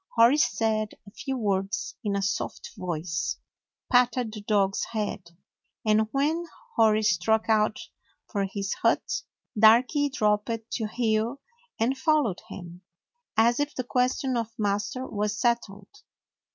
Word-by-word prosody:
Hori 235 +5 +6
said 220 -4 +1
a 200 - -13
few 265 +4 -4
words 200 -1 -1
in 205 -2 -1
a 200 - 0
soft 200 +1 -3
voice, 165 -2 -3 0.5
patted 245 -2 +3
the 210 - -7
dog's 200 -2 +1
head, 190 -5 -4 0.5
and 215 0 +3
when 310 +5 0 0.3
Hori 220 -1 +4
struck 215 +3 +2
out 215 -1 +2 0.5
for 200 -3 -1
his 195 0 -3
hut, - - +1 0.3
Darky 240 +7 +5
dropped 220 -2 0
to 220 - -1
heel 225 +3 0 0.4
and 240 +4 +2
followed 275 - +1
him, 175 -1 -9 0.6
as 235 +3 +4
if 290 +1 -1
the 255 - -2
question 250 +1 0
of 230 -2 -1
master 210 +4 -1
was 210 -2 -2
settled. 235 -5 -1
220 Hz, 130 wpm, -27 LUFS, 205-245 Hz, 0.6 s, Hori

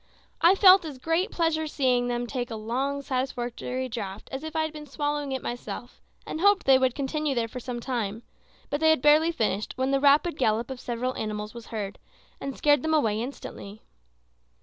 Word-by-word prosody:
I 350 +3 +6
felt 385 -1 +8
as 300 -5 -7
great 330 - 0
pleasure 325 -4 0
in 315 - -3
seeing 250 -4 +1
them 240 0 -1
take 245 0 -4
a 225 - -5
long, 265 +6 -2
satisfactory 255 -1 -3
draught 210 -5 -6
as 265 +2 -5
if 315 0 -7
I 315 - +2
had 315 -1 -4
been 300 -1 -9
swallowing 290 0 -2
it 265 -1 -3
myself, 245 0 -6 0.2
and 315 - -5
hoped 405 0 +4
they 265 -1 +6
would 260 -2 +1
continue 290 +1 -1
there 235 -1 0
for 250 +3 -7
some 245 -1 -5
time; 230 -3 -3 0.5
but 290 - 0
they 320 0 +4
had 315 -5 +3
barely 305 +3 +5
finished 215 - -1
when 260 +1 0
the 275 - +3
rapid 290 +4 +4
gallop 230 0 +1
of 260 - -6
several 245 +2 -2
animals 210 -1 -4
was 235 -1 -10
heard, 205 -3 -5 0.4
and 275 -1 -5
scared 290 -2 +4
them 315 +2 +1
away 220 -7 +1
instantly. 220 -5 -8
260 Hz, 200 wpm, -27 LUFS, 240-300 Hz, 0.5 s, felt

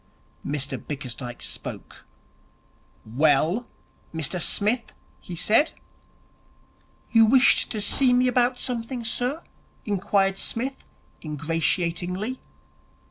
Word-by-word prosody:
Mr 140 -2 -2
Bickersdyke 125 -4 -6
spoke. - - -5 1.0
'Well, 155 - +2 0.4
Mr 160 +2 -1
Smith?' 220 +7 0 0.2
he 180 - -8
said. 220 - +3 1.4
'You 225 -1 +6
wished 265 +3 +4
to 220 - -3
see 250 +5 +4
me 250 +1 +3
about 250 0 +2
something, 240 0 -3
sir?' 250 +7 -1 0.4
inquired 195 -1 +1
Psmith, 265 +4 -2 0.4
ingratiatingly. 170 - -1
200 Hz, 85 wpm, -25 LUFS, 160-245 Hz, 1.4 s, You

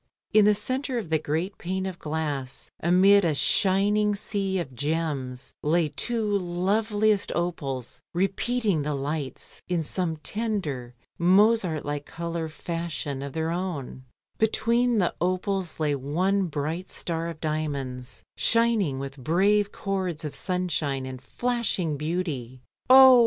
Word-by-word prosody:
In 215 -1 +7
the 210 0 +5
centre 255 +5 -1
of 195 -9 -4
the 160 - +3
great 160 +6 -2
pane 190 +2 -2
of 185 -2 -5
glass, 150 -4 -4
amid 190 +4 +5
a 160 -4 +2
shining 205 +6 +3
sea 195 -1 -1
of 145 -8 -4
gems, 140 -3 -2
lay 160 +1 +2
two 215 +6 -1
loveliest 205 +4 +1
opals 140 -8 -3
repeating 195 0 +1
the 150 0 -1
lights, 140 -1 -4
in 175 -2 0
some 165 0 -2
tender 155 - -3 0.2
Mozart 185 -2 +4
like 145 0 -3
colour 170 -1 -4
fashion 160 -4 -4
of 140 -1 -5
their 160 0 -1
own; 170 -8 -4 0.4
between 235 +2 +2
the 180 -4 +2
opals 185 -1 -1
lay 150 -2 +1
one 180 +8 +1
bright 160 +4 -3
star 165 -1 -2
of 165 -2 -6
diamonds 140 -5 -3
shining 230 -11 +2
with 135 +1 -6
brave 200 +6 +3
chords 185 -6 -3
of 150 - -4
sunshine 165 -7 -1
and 130 -1 -7
flashing 230 - -1
beauty. 145 -6 -3 0.3
"Oh! 260 0 +10
170 Hz, 130 wpm, -26 LUFS, 150-200 Hz, 0.4 s, Oh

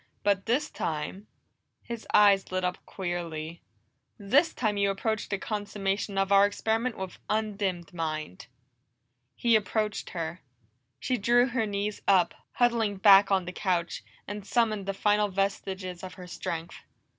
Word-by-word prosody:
But 200 0 +1
this 260 +7 +1
time" 160 +6 -4 0.6
His 235 -1 -7
eyes 200 -2 +5
lit 185 0 -1
up 180 0 -2
queerly 170 -3 -4 0.6
"this 280 - +3
time 215 -4 -1
you 200 0 +2
approach 220 +2 -2
the 200 - -1
consummation 200 -1 -3
of 195 0 +1
our 200 0 +7
experiment 225 +3 -1
with 190 -1 -6
undimmed 200 -6 -2
mind!" 155 - -4 0.9
He 235 -1 +3
approached 215 0 -1
her. 170 0 -5 0.6
She 255 - 0
drew 240 +4 +4
her 235 -3 0
knees 205 +1 -3
up, 185 -3 +4 0.2
huddling 230 -4 +2
back 195 0 +7
on 190 -2 +2
the 180 - -6
couch, 180 -3 -1 0.2
and 205 0 -5
summoned 215 -2 0
the 195 - -2
final 210 +1 +2
vestiges 190 -2 -2
of 185 - -7
her 180 - -10
strength. 170 -1 -5
200 Hz, 145 wpm, -28 LUFS, 185-215 Hz, 0.9 s, our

